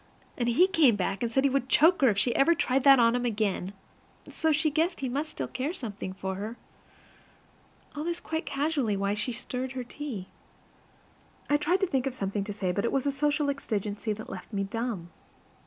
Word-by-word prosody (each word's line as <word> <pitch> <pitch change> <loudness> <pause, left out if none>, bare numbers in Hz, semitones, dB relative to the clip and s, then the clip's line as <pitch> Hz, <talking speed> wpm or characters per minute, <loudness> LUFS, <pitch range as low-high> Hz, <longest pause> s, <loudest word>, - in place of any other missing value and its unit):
And 240 -1 0
he 290 +10 +5
came 315 - +4
back, 195 0 -2
and 235 -1 -1
said 265 +3 +2
he 280 - +4
would 265 -1 0
choke 330 +5 +5
her 265 - +6
if 205 - 0
she 235 +4 +1
ever 335 +5 +4
tried 260 -3 +1
that 275 -1 +9
on 230 0 +5
him 245 0 0
again; 210 -5 -1 0.6
so 320 - 0
she 310 +1 +2
guessed 330 +3 0
he 265 - -1
must 290 +5 -2
still - - -4
care 275 +6 -3
something 210 - -5
for 190 0 -4
her. 215 +4 -5 1.4
All 295 - -3
this 345 +1 -2
quite 320 +1 -4
casually 275 -7 0
while 200 +1 0
she 210 +4 -2
stirred 250 +2 -4
her 255 -1 -4
tea. 240 -7 -6 1.2
I 290 - +5
tried 350 +6 +1
to - - +4
think 270 -5 0
of 260 - -3
something 200 -2 -2
to 210 - -5
say, 190 -3 -1
but 200 +3 -1
it 235 - 0
was 270 0 0
a 285 - +2
social 295 +1 0
exigency 215 -5 -3
that 220 +1 -8
left - - -8
me 200 -2 -1
dumb. 200 -4 -4
250 Hz, 210 wpm, -28 LUFS, 210-290 Hz, 1.4 s, that